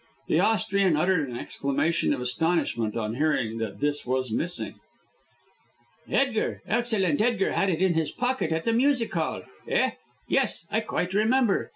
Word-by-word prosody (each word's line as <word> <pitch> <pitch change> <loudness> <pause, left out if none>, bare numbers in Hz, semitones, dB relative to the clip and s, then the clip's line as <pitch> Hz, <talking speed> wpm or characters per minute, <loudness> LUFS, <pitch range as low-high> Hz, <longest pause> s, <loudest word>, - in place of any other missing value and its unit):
The - - +3
Austrian 200 -5 +2
uttered 160 -4 +1
an 120 - -5
exclamation 140 +7 0
of - - -1
astonishment 125 -4 0
on 110 -1 -2
hearing 125 -5 0
that 100 -3 -5
this 145 0 0
was 130 -1 -1
missing. 175 +10 -3 1.3
"Edgar, 255 -5 0
excellent 215 -8 +1
Edgar, 225 -3 +2
had 195 - +1
it 175 0 0
in 185 -2 +3
his 160 -2 0
pocket 250 -9 -1
at 160 0 0
the 230 - +2
music 250 -1 +2
hall. - - -2 0.2
Eh! 480 +1 +2 0.4
yes, 265 -10 0
I 220 - +2
quite 185 -4 -2
remember. 220 +1 +2
175 Hz, 155 wpm, -26 LUFS, 140-225 Hz, 1.3 s, The